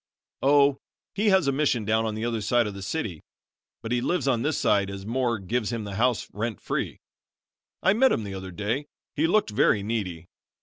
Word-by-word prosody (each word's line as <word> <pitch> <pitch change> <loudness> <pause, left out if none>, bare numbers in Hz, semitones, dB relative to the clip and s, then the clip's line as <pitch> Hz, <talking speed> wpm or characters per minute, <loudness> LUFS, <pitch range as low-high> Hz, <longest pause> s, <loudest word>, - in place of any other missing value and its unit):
"Oh, 140 0 +4 0.3
he 210 +1 +2
has 190 -6 +4
a - - +4
mission 135 -6 +1
down 110 +2 +2
on 110 - -3
the 110 +2 -3
other 115 -2 -1
side 120 +3 +2
of 105 - -4
the 100 - -8
city, 95 - -3 0.6
but 115 - -5
he 125 -1 +1
lives 175 +1 0
on 125 -4 +2
this 150 +3 0
side 100 -1 +2
as 100 0 -7
Moore 120 +1 0
gives 110 +3 -2
him 115 -2 -3
the 100 -1 -6
house 120 +3 +1
rent 110 +1 -3
free. - - -3 0.9
I 190 - +5
met 260 +5 +4
him 110 - 0
the 100 -1 -6
other 95 0 -6
day. 110 - -2 0.3
He 155 +2 +2
looked 205 - +2
very 105 0 +3
needy. 95 -7 -3
115 Hz, 210 wpm, -26 LUFS, 105-140 Hz, 0.9 s, I